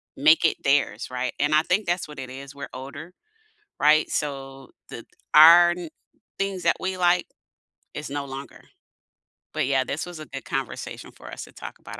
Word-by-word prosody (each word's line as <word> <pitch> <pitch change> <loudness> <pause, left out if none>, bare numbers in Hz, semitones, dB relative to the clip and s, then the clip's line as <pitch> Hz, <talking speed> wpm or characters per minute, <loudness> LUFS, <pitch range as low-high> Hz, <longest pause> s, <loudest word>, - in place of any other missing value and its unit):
make 155 +4 +5
it 160 - +3
theirs, 140 -5 +1
right? 125 0 -2
And 145 +1 +1
I 155 - +5
think 185 +5 0
that's 175 +1 -1
what 150 -1 -12
it 130 -1 -7
is. 135 +2 -10
We're 140 0 -7
older, 140 +6 -9 0.7
right? 155 +1 +4
So 135 -2 -4 0.2
the - - -8 0.3
our 170 +3 +9
n 175 -1 -5 0.5
things 195 -2 -2
that - - +3
we 185 0 -3
like 180 0 +3 0.7
is 150 -1 -6
no 140 0 -4
longer. 135 +1 -9 0.9
But, - - 0
yeah, 135 -1 +2
this 145 +4 -4
was 175 -2 -9
a 155 - -8
good 135 0 -8
conversation 135 -2 -5
for - - -13
us - - -7
to - - -17
talk - - -10
about, - - -10
145 Hz, 185 wpm, -24 LUFS, 135-175 Hz, 0.9 s, our